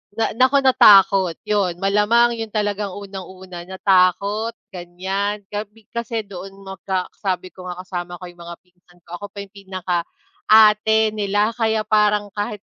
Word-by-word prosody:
Na 225 - 0
naku 260 +4 +3
natakot. 195 -8 +6
'Yun. 200 -4 -1
Malamang 210 +4 +3
'yun 225 -1 -4
talagang 205 -2 -2
unang-una, 190 -3 -9
natakot, 195 +4 +1 0.2
ganyan. 190 +3 -4
Gabi 210 +1 -7
kasi 235 -1 -3
doon 195 0 -10
magka 190 -1 -4
sabi 185 -2 -3
ko 185 -1 -11
nga 180 - -5
kasama 175 -1 -6
ko 175 - -13
'yung 175 -1 -11
mga 170 0 -9
pinsan 180 -1 -28
ko, 175 +1 -9
ako 205 - -7
pa 200 0 -8
'yung 200 - -16
pinaka 185 -3 -4 0.4
ate 220 0 +5
nila 205 +1 0
kaya 220 -2 0
parang 210 -1 +1
kahit 205 0 -5
200 Hz, 150 wpm, -20 LUFS, 185-215 Hz, 0.4 s, natakot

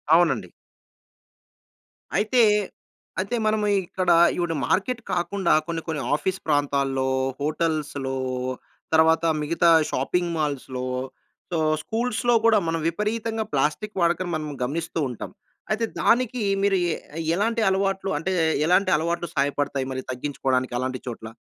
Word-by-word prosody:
అవునండి. 135 - +2 1.7
అయితే, 220 +4 +3 0.8
అయితే, 200 +6 -1
మనము 215 -1 +1
ఇ - - +3
ఇక్కడా 180 -2 +2 0.2
ఈవిడ 175 -2 0
మార్కెట్ 240 +5 0
కాకుండా 180 +1 +1
కొన్ని 165 -1 -3
కొన్ని 160 -3 -2
ఆఫీస్ 190 +5 -2
ప్రాంతాల్లో, 140 -3 +1 0.3
హోటల్స్‌లో 150 -3 -1 0.8
తరవాత 160 +1 +4 0.2
మిగతా 170 +3 +2 0.2
షాపింగ్ 170 +6 0
మాల్స్‌లో, 135 -4 -2 0.7
సో, 170 - 0 0.3
స్కూల్స్‌లో 240 +1 0
కూడా 225 -2 +6
మనం 165 0 0
విపరీతంగా 220 +4 -2
ప్లాస్టిక్ 150 +10 -1
వాడకం 175 +1 +1
మనం 155 -1 -3
గమనిస్తూ 160 +5 -3
ఉంటాం. 120 - -7 0.4
అయితే, 225 +1 +1 0.2
దానికి 245 -1 +2 0.2
మీరు 200 -1 +3 0.2
ఎ - - -2 0.4
ఎలాంటి 225 +3 +1
అలవాట్లు 195 0 0
అంటే, 185 +4 -2 0.4
ఎలాంటి 185 +2 +3
అలవాట్లు 170 +2 -2
సహాయపడతాయి 140 -1 0
మరి 130 - -3
తగ్గించుకోడానికి 130 -1 -1
అలాంటి 130 0 -3
చోట్ల. 115 -2 -6
170 Hz, 120 wpm, -24 LUFS, 145-200 Hz, 1.7 s, కూడా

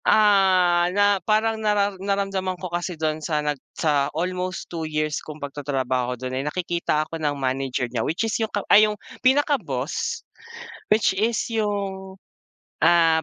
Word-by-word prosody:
Ah, 185 -4 +4
na 205 -1 +4
parang 220 0 +1
nara 205 -1 +2
naramdaman 195 -2 -1
ko 180 -1 -7
kasi 175 0 -3
dun 155 0 -1
sa 155 0 -1
nag 145 -3 -2 0.2
sa 145 -3 +1
almost 185 +2 -2
2 170 -1 -6
years 155 -1 -1
kung 155 -1 -9
pag-tatrabaho 130 -3 -2
dun 130 +1 -5
ay 130 - -1
nakikita 170 0 -1
ako 165 +1 -7
ng 145 -2 0
manager 130 -1 -1
niya 120 -1 -3
which 170 - -1
is 225 - -2
yung 220 - 0
ka 205 -2 -3
ay 215 +1 +7
yung 210 - -4 0.2
pinaka-boss. 255 - 0 0.7
Which 210 -2 +3
is 220 +4 +1 0.2
yung, 195 -3 -3 0.6
ah, 165 -1 +5
175 Hz, 155 wpm, -23 LUFS, 150-205 Hz, 0.7 s, ay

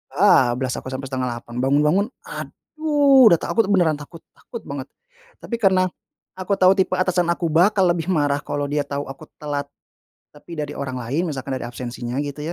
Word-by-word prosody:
bablas 125 0 +4
aku - - -11
sampai 135 +1 -5
7.30, 120 -2 -4
bangun-bangun, 150 +9 +2 0.2
aduh, 295 - +2
udah - - +7
takut, 225 -3 +1
beneran 175 -7 +2
takut 160 +3 -11 0.2
takut 235 - -9
banget. 140 -2 -6 0.6
Tapi 235 - -3
karena 185 -3 +3 0.5
aku 185 +2 -1
tau 185 0 +6
tipe 190 -1 +1
atasan 185 -1 +1
aku 170 -1 -1
bakal 190 +5 +4
lebih 170 -1 -3
marah 145 -4 +1
kalau 145 0 -3
dia 145 0 0
tau 140 0 -3
aku 145 +3 -12
telat 145 -1 -3 0.7
tapi 165 +3 -11
dari 150 -1 -3
orang 130 -2 -4
lain, 145 +9 -2
misalkan 135 -1 -5
dari - - -5
absensinya, 120 0 -6
gitu, 145 0 -6
150 Hz, 170 wpm, -22 LUFS, 135-185 Hz, 0.7 s, udah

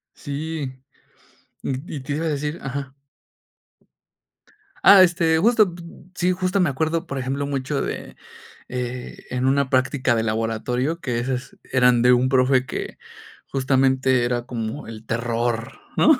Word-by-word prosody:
Sí, 145 -1 -4 0.9
y 135 +5 -4
y - - -4
te 140 +2 -4
iba 160 +3 -2
a - - +1
decir 150 +2 -2
ajá. 135 0 -5 1.9
Ah, 195 -2 +9
este, 170 -2 +3
justo, 215 -1 +4 0.4
sí, 180 +1 +2
justo 185 +1 0
me 175 - +3
acuerdo, 160 +5 -1
por 140 -4 -4
ejemplo, 135 +2 -2
mucho 140 0 -2
de, - - -5 0.5
eh, 125 0 -5
en 125 0 -1
una 135 0 +2
práctica 130 -1 +2
de 110 - +1
laboratorio, 115 +7 -1
que 125 -7 -2
esas 125 +2 -3 0.2
eran 125 -2 +4
de 125 +1 +6
un 125 +1 +3
profe 130 0 +3
que - - -5 0.5
justamente 130 -1 +2
era 120 0 -1
como 115 +2 -4
el 110 -1 -9
terror, 115 0 -2 0.2
¿no? 310 -2 +6
130 Hz, 140 wpm, -23 LUFS, 125-150 Hz, 1.9 s, Ah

